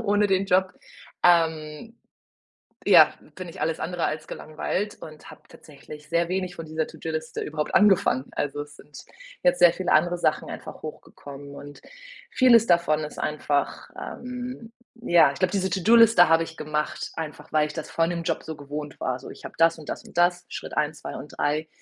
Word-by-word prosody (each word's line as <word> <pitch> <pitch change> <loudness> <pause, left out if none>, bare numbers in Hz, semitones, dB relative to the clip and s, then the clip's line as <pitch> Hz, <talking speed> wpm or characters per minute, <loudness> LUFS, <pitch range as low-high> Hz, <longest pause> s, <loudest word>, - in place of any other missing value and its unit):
ohne 205 0 +2
den 195 0 +1
Job, 185 0 +2 0.5
ähm, 165 +5 +1 0.9
ja, - - +8 0.2
bin 185 -1 -7
ich - - -10
alles 160 0 -1
andere 175 +1 -3
als 155 0 -2
gelangweilt 185 +6 -4
und 155 -1 -11
habe - - -15
tatsächlich 150 0 -13
sehr 170 0 +1
wenig 185 -1 -2
von 165 - -7
dieser 160 0 -2
To-do-Liste 160 0 -5
überhaupt 150 0 -4
angefangen. 190 -10 +4
Also, 145 0 -2
es 145 0 -11
sind 145 +1 -14 0.4
jetzt 265 0 +3
sehr 175 -1 +7
viele 185 - -2
andere 175 +3 +3
Sachen 155 - 0
einfach - - -9
hochgekommen 140 -2 -10
und 145 0 -11 0.5
vieles 235 -3 +5
davon 170 -3 +3
ist - - -10
einfach, 145 -1 -2
ähm 250 -2 -7 0.3
ja, 170 -5 +5
ich - - -11
glaube, 185 - +1
diese 190 -2 0
To-do-Liste 205 0 +5
habe 165 0 +4
ich 165 0 -9
gemacht, 150 0 -3
einfach 155 -2 -7
weil 155 -1 +2
ich 150 - -9
das 160 - -7
von 165 +1 +1
dem 170 -1 -3
Job 165 -1 -2
so 160 -1 -6
gewohnt 145 0 -7
war. 130 0 -2
So, 130 - -11
ich - - -12
habe - - -8
das 165 0 +4
und 155 - -12
das - - -5
und - - -15
das, 175 0 +2
Schritt - - -8
1, 150 0 -1
2 - - -6
und 145 +3 -11
3, 150 +2 0
165 Hz, 185 wpm, -25 LUFS, 150-185 Hz, 0.9 s, ja